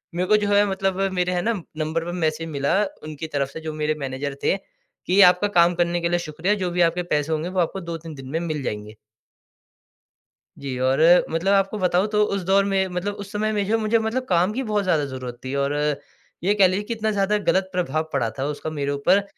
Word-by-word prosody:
मेरे 180 Hz, +1 st, 0 dB
को 215 Hz, -, +6 dB
जो 205 Hz, -, 0 dB
है, 205 Hz, 0 st, +5 dB
मतलब 195 Hz, -1 st, -1 dB
मेरे 180 Hz, 0 st, 0 dB
है 175 Hz, -, 0 dB
ना 230 Hz, -, +1 dB, 0.3 s
नंबर 160 Hz, +1 st, -2 dB
पर 175 Hz, -, -4 dB
मैसेज 165 Hz, -2 st, -1 dB
मिला 140 Hz, -2 st, 0 dB, 0.3 s
उनकी 155 Hz, +1 st, -6 dB
तरफ़ 140 Hz, -3 st, -1 dB
से, -, -, -7 dB
जो 155 Hz, -1 st, -5 dB
मेरे 155 Hz, 0 st, -1 dB
मैनेजर 135 Hz, +1 st, -4 dB
थे -, -, +3 dB, 0.5 s
कि, 185 Hz, +3 st, +2 dB
"आपका 180 Hz, +2 st, +6 dB
काम 170 Hz, +1 st, +5 dB
करने 175 Hz, 0 st, 0 dB
के 170 Hz, -, 0 dB
लिए 175 Hz, 0 st, +1 dB
शुक्रिया। 165 Hz, +4 st, -1 dB
जो 180 Hz, -, 0 dB
भी 175 Hz, 0 st, 0 dB
आपके 170 Hz, +1 st, +2 dB
पैसे 150 Hz, +1 st, -1 dB
होंगे, 160 Hz, +3 st, -2 dB
वो 185 Hz, 0 st, -2 dB
आपको 180 Hz, +3 st, -1 dB
2-3 165 Hz, -2 st, -7 dB
दिन 135 Hz, -1 st, -10 dB
में 160 Hz, +4 st, -1 dB
मिल 155 Hz, -4 st, -3 dB
जाएँगे।" 105 Hz, -1 st, -5 dB, 1.7 s
जी 135 Hz, -2 st, -4 dB
और 130 Hz, +2 st, +1 dB, 0.3 s
मतलब 170 Hz, +5 st, +1 dB
आपको 195 Hz, +1 st, +2 dB
बताऊँ 180 Hz, 0 st, +2 dB
तो 210 Hz, 0 st, +2 dB
उस 200 Hz, -, -1 dB
दौर 195 Hz, +1 st, +5 dB
में 195 Hz, -1 st, +1 dB
मतलब 180 Hz, +3 st, -3 dB
उस 200 Hz, -, -11 dB
समय 215 Hz, +1 st, 0 dB
में 205 Hz, -1 st, 0 dB
जो 225 Hz, +3 st, +2 dB
मुझे 220 Hz, +1 st, +2 dB
मतलब 225 Hz, +3 st, -2 dB
काम 180 Hz, +2 st, +2 dB
की 260 Hz, +5 st, -2 dB
बहुत 210 Hz, -4 st, 0 dB
ज़्यादा 160 Hz, -6 st, +2 dB
ज़रूरत 130 Hz, -3 st, -6 dB
थी। 130 Hz, +1 st, -4 dB
और 140 Hz, 0 st, 0 dB, 0.7 s
ये 200 Hz, +3 st, +3 dB
कह 200 Hz, -2 st, +6 dB
लीजिए 190 Hz, +3 st, -1 dB
कि 230 Hz, -, -2 dB
इतना 220 Hz, -1 st, -1 dB
ज़्यादा 205 Hz, 0 st, +1 dB
गलत 190 Hz, 0 st, +2 dB
प्रभाव 160 Hz, -3 st, -1 dB
पड़ा 135 Hz, -5 st, +1 dB
था 135 Hz, -, -1 dB
उसका 150 Hz, +1 st, -4 dB
मेरे 145 Hz, -2 st, -2 dB
ऊपर। 180 Hz, +8 st, +2 dB
175 Hz, 230 wpm, -23 LUFS, 150-195 Hz, 1.7 s, को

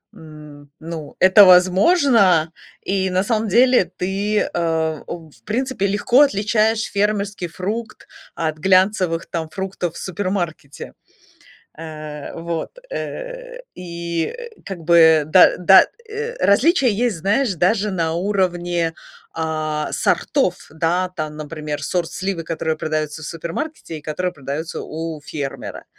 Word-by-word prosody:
м, 150 Hz, -3 st, -13 dB
ну, 160 Hz, -2 st, -8 dB
это 190 Hz, +2 st, +8 dB
возможно. 185 Hz, -, +5 dB, 0.3 s
И 190 Hz, -1 st, -1 dB
на 185 Hz, +1 st, +1 dB
самом 220 Hz, 0 st, 0 dB
деле 245 Hz, -1 st, +5 dB
ты, 200 Hz, +3 st, -1 dB
э, 160 Hz, -2 st, -1 dB
у 165 Hz, -2 st, -8 dB
в -, -, -23 dB
в -, -, -24 dB
принципе, 240 Hz, -2 st, -1 dB
легко 240 Hz, +7 st, +3 dB
отличаешь 220 Hz, -2 st, +2 dB
фермерский 205 Hz, -2 st, -1 dB
фрукт 215 Hz, +7 st, -5 dB, 0.3 s
от 155 Hz, -1 st, -2 dB
глянцевых 185 Hz, -1 st, +2 dB
там 165 Hz, -2 st, -3 dB
фруктов 190 Hz, -3 st, -4 dB
в -, -, -8 dB
супермаркете. 175 Hz, -6 st, -4 dB, 0.9 s
Э, 155 Hz, -2 st, -8 dB
вот. 165 Hz, 0 st, -4 dB, 0.2 s
Э, -, -, -6 dB
и, 170 Hz, -2 st, -4 dB
э, 475 Hz, -2 st, -9 dB
как 195 Hz, -3 st, -6 dB
бы 160 Hz, -2 st, +5 dB
да 180 Hz, +4 st, +6 dB
да, 190 Hz, +1 st, +7 dB, 0.2 s
э, 455 Hz, +3 st, -5 dB
различия 270 Hz, -, +4 dB, 0.2 s
есть, 225 Hz, -6 st, -1 dB
знаешь, 205 Hz, +6 st, +1 dB
даже 200 Hz, +5 st, +1 dB
на 165 Hz, -4 st, -1 dB
уровне, 175 Hz, -3 st, 0 dB, 0.4 s
а, 155 Hz, -1 st, -2 dB
сортов, -, -, +1 dB
да. 170 Hz, +4 st, 0 dB
Там, 155 Hz, -1 st, -4 dB
например, 150 Hz, -1 st, -5 dB
сорт 170 Hz, +3 st, -1 dB
сливы, 190 Hz, -3 st, -3 dB
которые 160 Hz, -1 st, -2 dB
продаются 155 Hz, 0 st, -3 dB
в -, -, -6 dB
супермаркете 170 Hz, -, -5 dB
и -, -, -15 dB
которые 175 Hz, +4 st, -3 dB
продаются 145 Hz, +4 st, -5 dB
у 160 Hz, -1 st, -6 dB
фермера. 145 Hz, -2 st, -6 dB
175 Hz, 130 wpm, -20 LUFS, 160-205 Hz, 0.9 s, это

